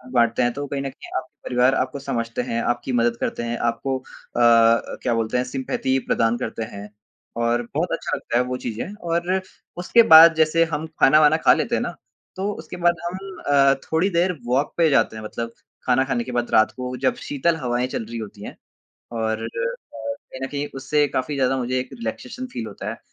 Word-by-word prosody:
बाँटते 115 +1 +3
हैं 120 0 +1
तो 145 +1 -4
कहीं 140 0 -3
न 135 - -3
कहीं 135 - -13
आपके 150 +2 -8
परिवार 125 +2 +3
आपको 130 +2 -1
समझते 115 -3 -3
हैं, 115 0 -2
आपकी 120 +2 -1
मदद 120 -1 +2
करते 120 - -2
हैं, 120 0 -2
आपको 120 +3 -1
अ 125 - -10
अ, 115 -1 +4
क्या 120 - +1
बोलते 115 +1 0
हैं 125 - +1
सिम्पैथी 130 0 -1
प्रदान 115 +1 +2
करते 115 -2 -4
हैं 100 +1 -8 0.5
और 120 +1 +2
बहुत - - 0
अच्छा - - -2
लगता 120 - -2
है 125 - +3
वो 125 0 -3
चीजें 120 - -4
और 175 0 -1 0.4
उसके 230 +6 +4
बाद 165 +1 +11
जैसे 160 +1 +3
हम 155 +2 -2
खाना-वाना 155 +2 +6
खा - - +5
लेते - - 0
हैं - - 0
ना, - - -4 0.4
तो 195 +2 -2
उसके 160 -1 -9
बाद 175 0 +3
हम 190 +2 -6
अ, 140 -1 +5
थोड़ी 165 +5 +1
देर 180 +1 +1
वॉक 130 +4 0
पे 165 -2 +4
जाते 135 - +2
हैं 110 - -7
मतलब 115 +2 -5 0.3
खाना 130 +1 +3
खाने 125 -3 -1
के 125 - -7
बाद 120 0 -2
रात 110 0 +4
को 125 0 -4
जब - - +3
शीतल 160 +4 +1
हवाएँ 125 -2 -1
चल 115 - -4
रही 115 +1 -7
होती 105 -2 -8
हैं। - - -8 0.6
और 110 -1 -1
अ, - - -2 0.5
कहीं 280 - -7
न - - -1
कहीं 145 0 -3
उससे 145 +2 +1
काफ़ी 130 +3 -2
ज़्यादा 135 -1 +1
मुझे 130 +1 -1
एक 130 - -6
रिलैक्सेशन 125 - -6
फील 110 - -4
होता 105 - -6
है, - - -7
130 Hz, 210 wpm, -22 LUFS, 120-155 Hz, 0.6 s, बाद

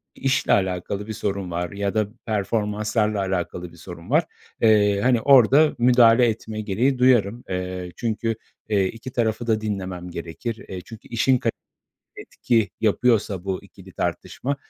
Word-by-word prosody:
i - - -17
işle 135 0 +2
alakalı 95 +2 -1
bir 110 - -4
sorun 100 -3 -3
var 85 +2 -3
ya 100 0 -2
da 110 -2 +1 0.2
performanslarla 105 0 0
alakalı 90 -2 -3
bir 85 - -17
sorun 85 +3 -11
var, 155 +4 +4 0.4
eee, 105 -3 +4
hani 125 -2 +3
orada 140 +3 +5
müdahale 120 0 +5
etme 110 -1 -3
gereği 115 +7 0
duyarım. 120 -3 +3
Eee, 90 -1 -4
çünkü, 115 -1 -2 0.3
eee, 100 -3 +2
iki 115 +5 -8
tarafı 115 0 -1
da 110 -1 +1
dinlemem 95 -4 -4
gerekir. 85 +8 -6
E, 90 -1 -6
çünkü 115 +2 -13
işin 125 +2 +2
kali 115 -1 -1 0.6
etki 115 -5 -1
yapıyorsa 110 -4 +1
bu 95 -1 -3
ikili - - -15
tartışma, 140 +2 -3
110 Hz, 150 wpm, -23 LUFS, 95-120 Hz, 0.6 s, orada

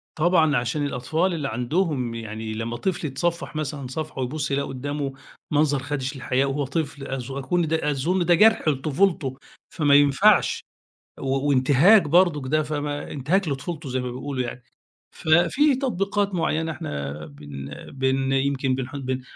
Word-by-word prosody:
طبعًا، 160 -2 +3
عشان 125 +5 -1
الأطفال 160 +8 0
اللي 150 -5 -2
عندهم، 125 0 -1
يعني 110 -1 -5
لما 115 +2 -4
طفل 170 +2 -2
يتصفح 170 +5 -2
مثلًا 145 -3 -3
صفحه 155 +2 -5
ويبُصّ 145 +3 -2
يلاقي 140 0 0
قدامه 140 +1 -4 0.4
منظر 145 -1 +2
خادش 145 -1 -3
للحياء 135 +1 0
وهو 145 +1 -1
طفل 140 -1 -3
أظ 135 -1 -5
كل 165 +5 0
ده 155 -1 0
أظن 170 +6 0
ده 175 - +5
جرح 220 -1 +4
لطفولته، 145 -1 +1 0.3
فما 145 -4 +3
ينفعش. 145 +9 +4 0.6
و 135 +2 -1
وانتهاك 145 +10 +5
برضه 165 0 +3
ده، 155 +2 +2
فما 145 -1 -4
انتهاك 160 +6 0
لطفولته 145 +3 -4
زي 130 +1 -1
ما 125 0 -4
بيقولوا 130 +1 -3
يعني. 125 0 -6 0.5
ففي 175 - +3
تطبيقات 205 -6 -1
معينة 160 -1 0
احنا 70 - -5
بن 70 -1 -9 0.3
بن 135 0 0
يمكن 135 -1 +1
بنح 130 +1 -5
بن 130 -2 -3
145 Hz, 150 wpm, -24 LUFS, 130-160 Hz, 0.6 s, ده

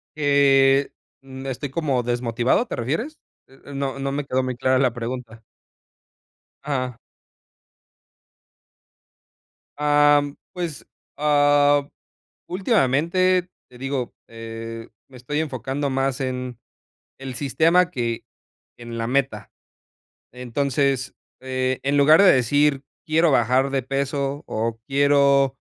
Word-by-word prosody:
Eh, 140 -2 +4 0.3
mm, 135 0 -10
estoy 135 +2 -4
como 135 -4 -1
desmotivado, 120 - 0
¿te - - -5
refieres? 160 - -3 0.3
Eh 135 - -20
eh, 140 - -10
no 135 0 -3
no 135 0 -2
me 145 0 -3
quedó 130 -1 0
muy 130 -1 -3
clara 130 +1 +1
la 130 -3 +2
pregunta. 120 -1 -6 1.2
Ah. 130 -4 -3 2.8
Am, 145 -1 +3 0.2
pues, 170 -5 -5 0.3
ah, 145 -1 +3 0.6
últimamente, 180 - +1 0.2
te 125 - -16
digo, 135 -1 -3
eh, 115 0 -8 0.2
me 130 - -15
estoy 145 +5 -3
enfocando 140 -1 -3
más 135 0 -1
en 125 -2 -4 0.6
el 135 -2 -7
sistema 165 +6 +2
que 120 -6 -3 0.5
en 120 -1 -8
la 115 0 -2
meta. 130 -5 -1 0.8
Entonces, 130 +1 -1 0.3
eh, 130 0 -2
en 140 +1 0
lugar 155 +6 +6
de 195 - +7
decir 140 +3 +2 0.2
quiero 160 +1 +3
bajar 130 +1 +2
de 135 -2 -1
peso, 140 +1 -2
o 115 +1 -3
quiero, 140 -1 +3
135 Hz, 110 wpm, -22 LUFS, 125-145 Hz, 2.8 s, de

